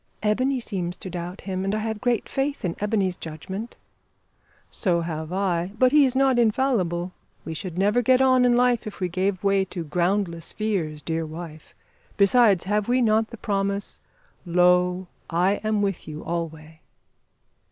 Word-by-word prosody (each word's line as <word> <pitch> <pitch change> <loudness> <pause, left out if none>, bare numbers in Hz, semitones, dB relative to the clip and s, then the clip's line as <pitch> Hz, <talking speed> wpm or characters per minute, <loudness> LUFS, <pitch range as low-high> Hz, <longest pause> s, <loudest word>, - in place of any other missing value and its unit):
"Ebony 255 +5 +1
seems 180 -6 -4
to 185 - -7
doubt 175 +2 -6
him; 190 -1 -3
and 195 +2 0
I - - 0
have 220 0 -3
great 245 -3 0
faith 275 -4 -2
in 170 - -2
Ebony's 205 -3 0
judgment." 190 +9 -7 0.9
"So 175 -5 +1
have 160 -1 -4
I; 185 -1 -1
but 255 +2 +4
he 295 -1 +6
is 260 -1 -1
not 265 -2 +3
infallible. 210 -7 +1 0.3
We 160 - -4
should 175 +2 -6
never 205 +5 +3
get 255 +2 +4
on 260 -1 +4
in 245 -1 +4
life 245 -2 +2
if 210 - -8
we 180 -2 -1
gave 185 +2 -1
way 195 -1 +3
to 175 -2 -5
groundless 170 +1 -1
fears, 175 -9 -2
dear 165 0 -2
wife. 155 0 -9 0.4
Besides, 200 -2 +5
have 210 +1 0
we 250 +1 +2
not 220 -2 +2
the 235 - -9
promise, 200 -1 -2 0.5
`Lo, 180 +1 +3 0.2
I 180 +4 +1
am 215 -1 +1
with 195 -3 -2
you 155 0 -7
alway?'" 160 -2 -5
195 Hz, 165 wpm, -24 LUFS, 175-220 Hz, 0.9 s, he